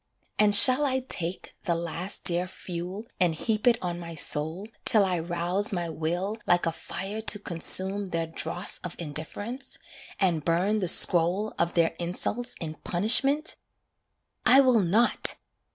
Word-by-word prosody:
And 210 -1 +6
shall 255 +6 +8
I 260 -2 0
take 180 -8 -6
The 170 -3 0
last 170 +3 -5
dear 175 +1 0
fuel 180 +4 -7
and 175 -4 +1
heap 215 +6 -2
it 235 -2 +4
on 175 -1 -4
my 170 -1 -8
soul 160 +6 -1 0.2
Till 210 -3 +3
I 180 -2 -1
rouse 175 +4 -2
my 175 -3 -3
will 175 +7 -3
like 175 -1 +2
a 165 - 0
fire 195 +6 -6
to 220 -1 +2
consume 190 +2 +1
Their 165 -2 -3
dross 175 +3 -3
of 180 - -8
indifference, 175 - -6 0.4
and 175 -6 0
burn 180 +7 0
the 185 - -2
scroll 175 +5 +5
Of 170 0 -1
their 165 -1 +2
insults 225 +8 -3
in 155 -3 -7
punishment? 270 - +2 0.9
I 260 +2 +6
will 255 -4 +4
not! 210 +6 +1
180 Hz, 150 wpm, -26 LUFS, 170-215 Hz, 0.9 s, shall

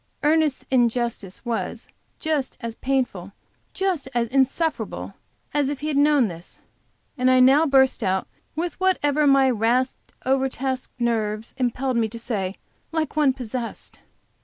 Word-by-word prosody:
Ernest's 305 -2 +2
injustice 235 -5 0
was 235 -1 -3 0.3
just 305 -4 -2
as 230 -2 -5
painful, 245 -9 -2 0.4
just 365 -8 -1
as 235 -1 +2
insufferable 275 +5 0 0.4
as 290 -2 +2
if 285 -1 -4
he 305 - -2
had 295 - -1
known 285 -3 +4
this, 170 -2 -9 0.6
and 255 +1 +4
I 255 0 +5
now 275 +5 +6
burst 265 -2 +4
out 190 0 0 0.3
with 340 +4 -3
whatever 300 -6 +2
my 275 -1 +5
rasped, 250 +2 0
over 265 +1 +2
taxed 260 0 -3
nerves 225 -2 -1
impelled 255 0 0
me 225 -1 +1
to 230 - -7
say, 205 -5 -3 0.4
like 320 -2 -2
one 295 -3 +4
possessed. 250 -2 -6
260 Hz, 140 wpm, -23 LUFS, 235-290 Hz, 0.6 s, now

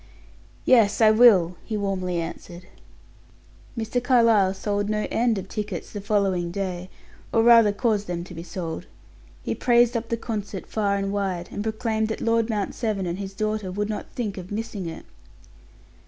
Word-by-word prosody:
"Yes, 225 -5 +4
I 220 -2 +7
will," 200 -7 +5
he 220 - -3
warmly 185 -3 -1
answered. 170 +1 -7 1.1
Mr. 230 +2 -1
Carlyle 230 -7 +4
sold 205 +1 -2
no 210 0 0
end 235 -2 +2
of 190 0 -5
tickets 205 -4 -5
the 205 - -5
following 195 -4 0
day, 185 -1 -4 0.4
or 225 - +3
rather 230 -3 +7
caused 210 -1 0
them 175 -1 -3
to 180 - -11
be 165 - -7
sold. 170 0 -6 0.6
He - - -1
praised 240 -1 +3
up 230 0 -2
the 230 - 0
concert 210 -5 -5
far 205 -2 0
and 195 0 -2
wide, 190 -4 -2
and - - -4
proclaimed 220 0 -1
that 220 - -4
Lord 230 0 +1
Mount 210 -3 -1
Severn 215 -5 -2
and 175 +2 -3
his 195 -1 -6
daughter 215 -2 -2
would 205 +3 -2
not 215 - -4
think 210 -6 -4
of 180 0 -9
missing 210 -3 -4
it. 165 - -8
205 Hz, 170 wpm, -24 LUFS, 185-225 Hz, 1.1 s, I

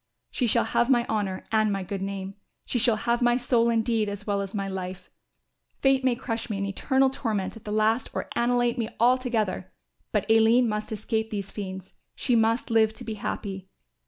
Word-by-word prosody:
"She 250 - 0
shall - - +4
have 235 +1 +1
my 240 -3 +4
honour 200 -4 -2
and 215 -1 +3
my 195 -1 -2
good 195 +1 -5
name, 195 0 -4 0.3
she 245 - -1
shall 230 -1 +4
have 235 +3 0
my 240 0 +4
soul 240 -2 +2
indeed 225 -2 +1
as 205 0 -6
well 200 -1 0
as 195 +1 -5
my 195 -1 -2
life. 185 -1 -6 0.7
Fate 270 -1 +3
may 255 -2 +3
crush 235 -2 -4
me 210 - -2
in 200 - -1
eternal 265 +7 +2
torment 215 -7 -2
at 225 - -13
the 210 - -4
last 215 +3 +1
or - - -4
annihilate 240 0 +1
me 225 -1 -1
altogether; 240 -4 +1 0.4
but - - +1
Aline 225 +2 +5
must 210 0 -3
escape 220 +1 -2
these 200 -3 -4
fiends; 190 -2 -7 0.2
she 250 - +1
must 230 +2 +2
live 220 -1 +3
to - - -8
be 225 - -4
happy. 195 -2 -5
220 Hz, 195 wpm, -26 LUFS, 200-240 Hz, 0.7 s, Aline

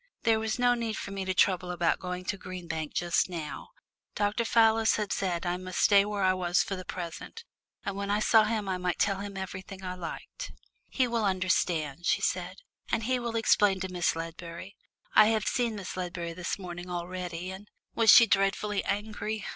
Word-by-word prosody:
There 225 -1 +3
was 220 +1 -2
no 245 0 +4
need 230 -2 -2
for 200 - -6
me 195 -1 -4
to 185 - 0
trouble 180 -1 +2
about 175 -1 +1
going 180 0 -5
back - - -7
to 200 - -8
Green 185 -2 -8
Bank 160 -2 -3
just 175 +1 +1
now. 160 - -6 0.5
Dr. 210 +3 0
Fallis 225 -1 +4
had 210 -2 -1
said 180 -3 -1
I 175 0 0
must 185 0 -7
stay 200 -2 +6
where 205 -1 -2
I 185 0 +4
was 180 -1 +1
for 195 - -4
the 185 - -7
present, 180 - -7 0.4
and 200 - -2
when 200 0 -3
I 205 +1 +2
saw 215 0 +5
him 215 -2 -1
I 185 -1 -1
might 180 -1 -1
tell 195 -1 +1
him 200 -1 -6
anything 190 0 -7
I 180 -1 -3
liked. 185 - -7 0.4
"He 255 -2 +1
will 235 -2 0
understand," 175 -5 0
she - - +3
said, - - -1 0.4
"and 220 - +1
he 255 +2 +1
will 235 -1 -4
explain 205 -3 +3
to 190 -1 -4
Miss 175 -2 +1
Ledbury. 165 +3 -7 0.4
I 215 - +7
have 220 -1 +1
seen 240 -3 0
Miss 200 -2 -6
Ledbury 175 -2 -4
this 175 0 -3
morning 180 -2 -7
already, 180 0 -4
and 195 +2 -10
" - - -56
"Was 225 -1 +3
she 230 - +10
dreadfully 200 0 +1
angry?" 210 +1 -3
190 Hz, 205 wpm, -29 LUFS, 180-215 Hz, 0.5 s, she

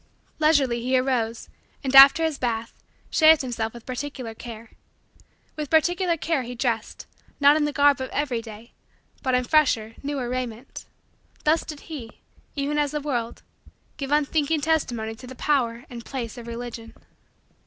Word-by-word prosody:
Leisurely 285 -6 +3
he 255 +2 +1
arose 245 -3 -1 0.4
and, 270 0 -1
after 275 +4 +9
his 320 -3 -1
bath, 230 -2 -2 0.4
shaved 315 -2 +6
himself 230 -3 -3
with 235 0 -13
particular 255 -2 -5
care. 225 0 -10 0.8
With 300 -2 -5
particular 345 +2 +2
care 320 -2 0
he 245 0 -7
dressed, 230 -3 -2 0.3
not 285 +1 +6
in 305 -1 +2
the 295 - -1
garb 285 -1 +3
of 260 - -4
every 265 -5 -1
day, 225 +1 -12 0.5
but 260 -2 +1
in 250 - +2
fresher, 245 -6 +2
newer, 275 -3 -3
raiment. 245 -1 -5 0.6
Thus 310 +2 +2
did 300 -2 -8
he, 270 -9 -9 0.3
even 290 +1 -1
as 295 -1 +1
the 300 +1 -3
world, 245 -6 -3 0.5
give 275 -2 -4
unthinking 300 +1 +1
testimony 250 -8 -1
to 245 +3 -12
the 260 - -9
power 245 -4 0
and 235 -1 -9
place 240 -4 -5
of 235 -1 -10
Religion. 235 -1 -7
260 Hz, 155 wpm, -24 LUFS, 235-295 Hz, 0.8 s, after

